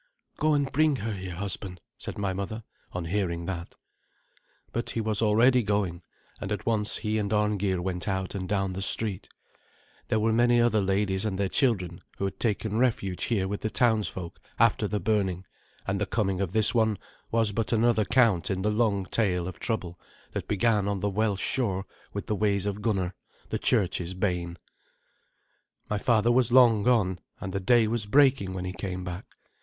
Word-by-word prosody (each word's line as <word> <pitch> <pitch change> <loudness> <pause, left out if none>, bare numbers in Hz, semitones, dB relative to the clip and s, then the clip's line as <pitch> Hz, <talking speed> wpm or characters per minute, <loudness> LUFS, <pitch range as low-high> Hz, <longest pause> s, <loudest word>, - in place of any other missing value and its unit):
"Go 155 0 +2
and 140 -2 0
bring 155 +1 +3
her 110 -2 -3
here, 95 -3 -6
husband," 95 -1 -4 0.2
said - - -7
my 100 -2 -1
mother, 100 +4 -4 0.3
on 90 -1 -4
hearing 85 -2 -1
that. 85 -2 -5 1.0
But 120 - -2
he - - -2
was 110 -1 0
already 115 +4 +4
going, 100 -5 -1 0.4
and 100 - -5
at 105 - -3
once 110 -2 +1
he 110 0 -1
and 100 -1 -2
Arngeir 105 -3 +1
went 90 0 -3
out 95 -2 -2
and 95 -2 -4
down 95 -2 0
the 95 - -4
street. 100 -1 -2 0.8
There 110 - +1
were 110 +1 +2
many 120 +1 +4
other 115 -3 +3
ladies 95 0 0
and 105 -4 -2
their 100 0 +1
children 95 - 0 0.2
who 100 - -1
had 95 - -4
taken 110 -1 0
refuge 105 -7 0
here 100 -5 0
with 100 +1 -4
the 110 - -1
townsfolk 110 -8 0 0.2
after 115 -2 +3
the 105 +1 -1
burning, 95 -2 0 0.4
and 100 0 -2
the 105 - 0
coming 95 -4 0
of 95 -3 -1
this 110 +1 +4
one 110 -3 +2 0.3
was 115 -2 +2
but 110 +1 -1
another 115 -1 +3
count 105 -5 +3
in 95 -1 -1
the 105 - +2
long 105 -3 +1
tale 90 -4 0
of 95 - -7
trouble 90 -7 -3 0.3
that - - -4
began 105 -1 +2
on 100 -2 -1
the 100 - 0
Welsh 105 -1 0
shore 100 -7 0 0.3
with - - -5
the 105 - -1
ways 100 -1 +1
of 100 0 -3
Gunnar, 95 -5 0 0.4
the - - -2
church's 95 -5 +1
bane. 90 -3 -2 1.3
My 105 - 0
father 115 +1 +3
was 125 -1 +3
long 120 -4 +6
gone, 100 -6 +2 0.2
and 95 - -5
the 100 - -1
day 115 +3 +4
was 110 -2 -1
breaking 130 -7 +3
when 90 -1 -4
he 90 - -4
came 95 -1 -5
back. 90 +1 -6
105 Hz, 185 wpm, -27 LUFS, 95-110 Hz, 1.3 s, long